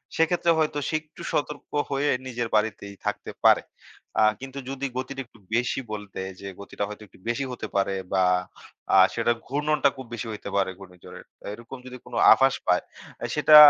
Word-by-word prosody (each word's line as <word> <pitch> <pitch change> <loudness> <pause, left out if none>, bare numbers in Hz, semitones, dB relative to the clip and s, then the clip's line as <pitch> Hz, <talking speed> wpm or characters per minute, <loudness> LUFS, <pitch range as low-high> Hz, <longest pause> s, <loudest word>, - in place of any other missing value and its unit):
সেক্ষেত্রে 170 +1 +3
হয়তো 155 -1 +1
সে - - 0
একটু 155 0 -15
সতর্ক 150 0 -2 0.2
হয়ে 140 +1 +2 0.2
নিজের 120 -2 -2
বাড়িতেই 105 -2 0
থাকতে - - -2
পারে। - - +7 0.6
আ - - +7 0.2
কিন্তু 135 +1 -6
যদি 135 0 -3
গতিটা 130 +1 -3
একটু 115 -1 -21 0.2
বেশি 125 +2 +1
বলতে, 105 -2 -5 0.2
যে 100 - -7
গতিটা 100 0 -4
হয়তো 105 +1 -8
একটু 95 - -20
বেশি 120 +4 0
হতে 120 -3 -5
পারে 100 0 +2 0.2
বা, 95 -1 +4 0.7
আ - - +8 0.2
সেটার 120 0 +2
ঘূর্ণনটা 150 +1 +2
খুব 130 - -7
বেশি 120 0 -4
হইতে 105 - -6
পারে 100 -1 +3
ঘূর্ণিঝড়ের। 90 -2 -12 0.2
আ - - -11
এরকম 115 +4 -9
যদি 125 0 -8
কোনো - - -5 0.2
আভাস 135 0 +4
পায়, 90 0 +4 0.5
সেটা 150 0 +6
120 Hz, 175 wpm, -26 LUFS, 105-140 Hz, 0.7 s, আ